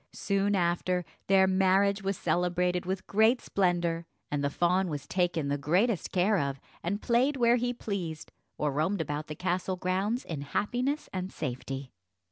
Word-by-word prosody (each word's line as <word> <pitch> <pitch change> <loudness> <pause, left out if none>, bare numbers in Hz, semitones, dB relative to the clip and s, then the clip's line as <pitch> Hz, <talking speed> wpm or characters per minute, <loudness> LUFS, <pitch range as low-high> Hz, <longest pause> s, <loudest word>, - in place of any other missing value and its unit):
Soon 200 0 +1
after, 180 0 +1 0.2
their 190 -1 +6
marriage 195 +1 +3
was 195 -1 -1
celebrated 180 0 0
with 190 0 -2
great 220 +4 +4
splendour, 175 -3 0 0.2
and 145 -1 -1
the 140 - +2
fawn 180 +5 +2
was 145 -3 -4
taken 175 -3 0
the 140 0 -1
greatest 180 - +1
care 195 +2 +3
of, 140 -1 -2 0.2
and 200 +5 -2
played 255 +4 +2
where 240 -1 +4
he 245 0 0
pleased, 190 -9 -5 0.3
or 150 -1 0
roamed 160 +8 0
about 150 -1 -3
the 150 - -6
castle 185 +2 -1
grounds 190 +7 -1
in 155 -4 -4
happiness 245 - -1
and 185 0 -3
safety. 135 -1 -5
185 Hz, 160 wpm, -29 LUFS, 165-200 Hz, 0.3 s, their